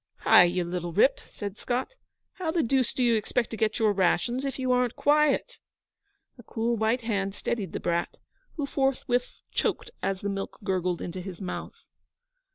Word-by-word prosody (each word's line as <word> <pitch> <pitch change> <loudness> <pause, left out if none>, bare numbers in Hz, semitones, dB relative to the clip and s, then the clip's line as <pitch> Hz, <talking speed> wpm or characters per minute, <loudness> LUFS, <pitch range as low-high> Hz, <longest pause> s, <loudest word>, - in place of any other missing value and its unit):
'Hai, 180 - +7
you 175 +1 0
little 175 0 -3
rip,' 240 - +4
said 205 -1 -7
Scott, 250 - -2 0.4
'how 365 -4 -3
the 330 0 +1
deuce 255 0 +2
do 255 - -1
you 240 -1 +4
expect 225 +2 0
to - - -3
get 220 -1 0
your 215 -3 +3
rations 200 +7 +1
if 275 - -3
you 260 -1 0
aren't 250 -1 +2
quiet?' 300 - +2 0.8
A - - -11
cool 230 +2 -1
white 225 +3 +1
hand 200 -4 -1
steadied 200 -6 -3
the - - -4
brat, 170 0 -1 0.4
who 295 - -2
forthwith 270 -3 0 0.2
choked - - -1
as 195 0 -1
the 205 - -2
milk 195 0 -4
gurgled 185 -3 -1
into 180 +1 -5
his 185 -1 -8
mouth. 185 -3 -6
225 Hz, 175 wpm, -27 LUFS, 190-255 Hz, 0.8 s, Hai